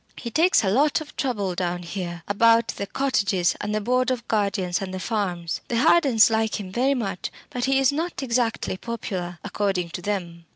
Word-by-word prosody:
"He 235 Hz, -, -6 dB
takes 330 Hz, -, +4 dB
a 195 Hz, -, +1 dB
lot 285 Hz, +8 st, +3 dB
of 310 Hz, -, -10 dB
trouble 205 Hz, -9 st, -1 dB
down 175 Hz, 0 st, -2 dB
here, 175 Hz, -1 st, -5 dB
about 230 Hz, +3 st, +4 dB
the 200 Hz, -, -4 dB
cottages 200 Hz, -10 st, +1 dB
and 210 Hz, +1 st, -2 dB
the -, -, +1 dB
board 250 Hz, +4 st, +1 dB
of 245 Hz, -2 st, -2 dB
guardians 200 Hz, -4 st, 0 dB
and 190 Hz, -1 st, -4 dB
the 185 Hz, -, -4 dB
farms. 180 Hz, -4 st, -2 dB
The 235 Hz, -, -1 dB
Hardens 265 Hz, -6 st, +5 dB
like 220 Hz, -1 st, 0 dB
him 190 Hz, -2 st, -7 dB
very 260 Hz, +7 st, +2 dB
much, 195 Hz, -7 st, -3 dB, 0.2 s
but 245 Hz, -1 st, -1 dB
he 270 Hz, 0 st, +2 dB
is 270 Hz, -1 st, +4 dB
not 320 Hz, 0 st, -3 dB
exactly 235 Hz, -5 st, 0 dB
popular, 185 Hz, -6 st, -5 dB
according 190 Hz, -4 st, -1 dB
to 180 Hz, -, -5 dB
them. 175 Hz, -4 st, -4 dB
210 Hz, 195 wpm, -24 LUFS, 185-250 Hz, 0.2 s, Hardens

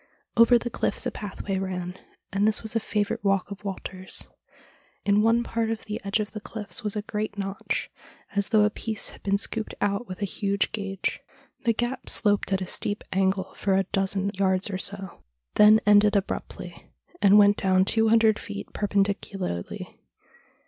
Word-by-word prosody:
Over 230 Hz, +1 st, +7 dB
the 240 Hz, 0 st, -4 dB
cliffs -, -, -1 dB
a -, -, -1 dB
pathway 195 Hz, -1 st, -4 dB
ran, 180 Hz, -1 st, -4 dB, 0.4 s
and 200 Hz, +2 st, +2 dB
this 215 Hz, +1 st, 0 dB
was 220 Hz, +1 st, -4 dB
a -, -, +4 dB
favourite 210 Hz, -2 st, -2 dB
walk 195 Hz, 0 st, +1 dB
of 200 Hz, +1 st, -8 dB
Walter's. 190 Hz, -1 st, -5 dB, 0.8 s
In 205 Hz, +1 st, +4 dB
one 230 Hz, +2 st, +3 dB
part 230 Hz, -1 st, -1 dB
of 225 Hz, -1 st, -3 dB
the 210 Hz, 0 st, -5 dB
edge 200 Hz, +2 st, 0 dB
of 210 Hz, -1 st, -3 dB
the 215 Hz, -, -7 dB
cliffs 220 Hz, +2 st, -6 dB
was 210 Hz, -1 st, -2 dB
a 210 Hz, -, -2 dB
great 210 Hz, -1 st, -4 dB
notch, 195 Hz, 0 st, -3 dB, 0.4 s
as 200 Hz, 0 st, +1 dB
though 215 Hz, -2 st, +5 dB
a 210 Hz, -, +3 dB
piece 220 Hz, 0 st, -2 dB
had -, -, -14 dB
been 200 Hz, 0 st, +1 dB
scooped 220 Hz, +2 st, -2 dB
out 205 Hz, +3 st, 0 dB
with 185 Hz, -, -7 dB
a -, -, +2 dB
huge 200 Hz, 0 st, 0 dB
gauge. 195 Hz, -3 st, -3 dB, 0.5 s
The 230 Hz, -, +4 dB
gap 240 Hz, +3 st, -3 dB
sloped 205 Hz, -3 st, +3 dB
at 190 Hz, 0 st, +1 dB
a -, -, -2 dB
steep 205 Hz, +3 st, -2 dB
angle 190 Hz, 0 st, 0 dB
for 195 Hz, -1 st, 0 dB
a 195 Hz, -, +3 dB
dozen 195 Hz, +1 st, -1 dB
yards 190 Hz, +1 st, +1 dB
or 185 Hz, -, -3 dB
so, 195 Hz, -2 st, -3 dB, 0.3 s
then 215 Hz, +1 st, +7 dB
ended 205 Hz, 0 st, +5 dB
abruptly, 200 Hz, -1 st, -4 dB, 0.3 s
and 200 Hz, +1 st, +7 dB
went 205 Hz, 0 st, +6 dB
down 190 Hz, 0 st, +3 dB
two 225 Hz, +2 st, +3 dB
hundred 220 Hz, -1 st, +4 dB
feet 100 Hz, 0 st, -7 dB
perpendicularly. 195 Hz, -, -2 dB
205 Hz, 180 wpm, -26 LUFS, 195-215 Hz, 0.8 s, Over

